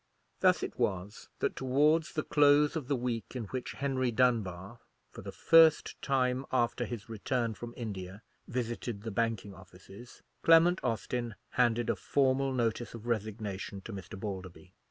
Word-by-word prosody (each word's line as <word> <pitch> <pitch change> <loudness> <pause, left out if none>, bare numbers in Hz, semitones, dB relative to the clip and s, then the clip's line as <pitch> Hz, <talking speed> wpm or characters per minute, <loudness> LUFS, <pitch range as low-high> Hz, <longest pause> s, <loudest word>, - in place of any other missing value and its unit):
Thus - - +3
it - - -6
was 95 +2 -2
that - - 0
towards 150 +5 +2
the 155 - -1
close 145 +1 +4
of 150 -6 -3
the 140 - +1
week 120 -1 -3
in 125 - -3
which 130 -1 -4
Henry 130 -2 -1
Dunbar, 110 -4 0 0.3
for - - -10
the - - -7
first 165 -1 +4
time 130 -1 +1
after 120 -1 +1
his 115 0 -7
return 115 +1 -2
from 120 +2 -9
India, 100 -4 -6 0.2
visited 120 -3 -4
the 115 - -4
banking 110 -2 -1
offices, 95 +5 -14 0.2
Clement 165 +2 +5
Austin 120 -1 -2 0.2
handed 120 -1 +2
a - - +1
formal 135 -1 +1
notice 120 -2 -1
of 115 0 -10
resignation 105 -3 -3
to 110 - -8
Mr. 95 -1 -8
Balderby. 95 -3 -7
120 Hz, 155 wpm, -31 LUFS, 105-130 Hz, 0.3 s, Clement